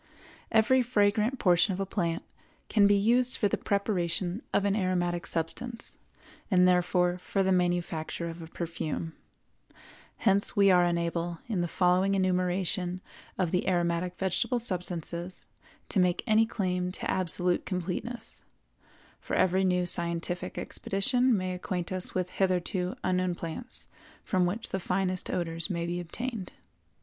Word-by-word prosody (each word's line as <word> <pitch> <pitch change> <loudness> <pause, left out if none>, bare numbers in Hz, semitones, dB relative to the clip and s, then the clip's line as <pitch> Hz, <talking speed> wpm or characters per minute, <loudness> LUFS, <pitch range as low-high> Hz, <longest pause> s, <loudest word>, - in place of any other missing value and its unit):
Every 230 +4 +4
fragrant 220 +1 +2
portion 180 -1 +3
of - - -7
a 195 - 0
plant 170 -4 -2 0.5
can 205 -2 +5
be 205 - +5
used 240 +5 +3
for 205 - +2
the - - 0
preparation 195 -1 -1
of 200 - +2
an 200 0 +2
aromatic 175 -3 0
substance, 230 +9 -3 0.5
and 180 -3 +5
therefore 180 0 +2
for 195 +2 -1
the 190 - +2
manufacture 175 -2 0
of 165 0 -7
a 165 - -8
perfume. 165 -1 -4 1.0
Hence 200 -2 +2
we 200 -1 +5
are 180 -1 +5
unable, 170 0 -1
in 210 -7 -1
the 175 - 0
following 185 +3 +2
enumeration 185 -1 0 0.4
of 175 -3 0
the 180 - 0
aromatic 175 0 0
vegetable 190 +6 0
substances, 180 -4 -2 0.4
to 200 - +1
make 180 -1 +2
any 220 +1 +4
claim 180 -4 -1
to - - -3
absolute 180 -1 0
completeness; 185 +6 -4 0.8
for - - -4
every 185 +1 +3
new 180 -1 +2
scientific 170 +1 -1
expedition 245 +4 +1
may 185 -1 -2
acquaint 180 -1 -4
us 185 0 +2
with 180 -1 -1
hitherto 185 0 0
unknown 185 -1 +1
plants 170 +10 -4 0.4
from 185 -3 +1
which 215 +6 -3
the 190 - -2
finest 185 0 -1
odors 165 +1 -2
may 170 -3 -2
be 175 +1 -2
obtained. 215 +3 -4
180 Hz, 140 wpm, -29 LUFS, 175-200 Hz, 1.0 s, can